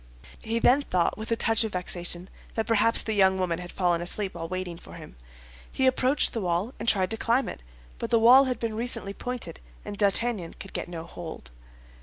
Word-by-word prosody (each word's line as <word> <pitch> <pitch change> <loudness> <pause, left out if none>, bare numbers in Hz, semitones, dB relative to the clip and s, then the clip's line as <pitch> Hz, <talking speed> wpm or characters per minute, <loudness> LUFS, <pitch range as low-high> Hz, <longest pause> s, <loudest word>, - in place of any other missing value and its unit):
He 225 +1 -2
then 250 +4 +4
thought, 180 -10 0
with 220 +1 -7
a - - +3
touch 225 0 +2
of 220 - -4
vexation, 180 0 -4 0.3
that 225 - 0
perhaps 225 0 +3
the 220 - -2
young 190 -2 +4
woman 180 -2 -1
had 180 0 -8
fallen 175 -2 +1
asleep 190 +3 0
while 165 - -5
waiting 185 -2 -4
for - - -13
him. - - -11 0.6
He 265 - 0
approached 260 +2 +3
the 225 - -2
wall, 180 +6 -1
and 225 - 0
tried 185 -3 +2
to 225 - 0
climb 235 +4 +1
it; - - -7 0.4
but - - -3
the 230 - +4
wall 245 +4 +7
had 255 -1 -1
been 230 -1 -3
recently 225 -3 0
pointed, 250 - -5 0.3
and 205 - -5
D'Artagnan 200 -2 +1
could 195 - -10
get - - -3
no 170 -2 -6
hold. 165 - -9
205 Hz, 210 wpm, -26 LUFS, 180-230 Hz, 0.6 s, wall